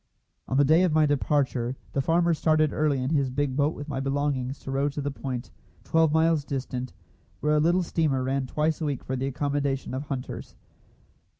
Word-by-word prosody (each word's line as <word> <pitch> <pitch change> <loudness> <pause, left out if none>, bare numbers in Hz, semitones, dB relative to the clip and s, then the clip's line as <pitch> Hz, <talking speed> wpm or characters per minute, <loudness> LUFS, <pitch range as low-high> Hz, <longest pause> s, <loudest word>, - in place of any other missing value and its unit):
On 130 - 0
the 145 - +5
day 160 +5 +5
of 185 -3 +3
my 155 0 +4
departure 135 -4 0 0.2
the 140 - +1
farmer 170 +4 +2
started 155 -1 +2
early 145 -4 +1
in 130 - -1
his 140 -4 +2
big 135 0 -1
boat 145 +2 +1
with 145 - -7
my 135 -3 -3
belongings 135 -1 -1
to 135 - -6
row 140 +2 +1
to 145 - -6
the 145 0 -2
point, 130 -2 -5 0.3
twelve 160 -1 +3
miles 160 -1 +3
distant, 130 -2 -4 0.5
where 150 +1 +1
a - - +4
little 175 +4 +3
steamer 150 -6 0
ran 135 0 -1
twice 155 +4 0
a - - 0
week 140 -4 -2
for 130 - -3
the 130 +1 -2
accommodation 140 -1 -1
of 135 +3 -3
hunters. 135 -3 -6
145 Hz, 200 wpm, -26 LUFS, 135-155 Hz, 0.5 s, the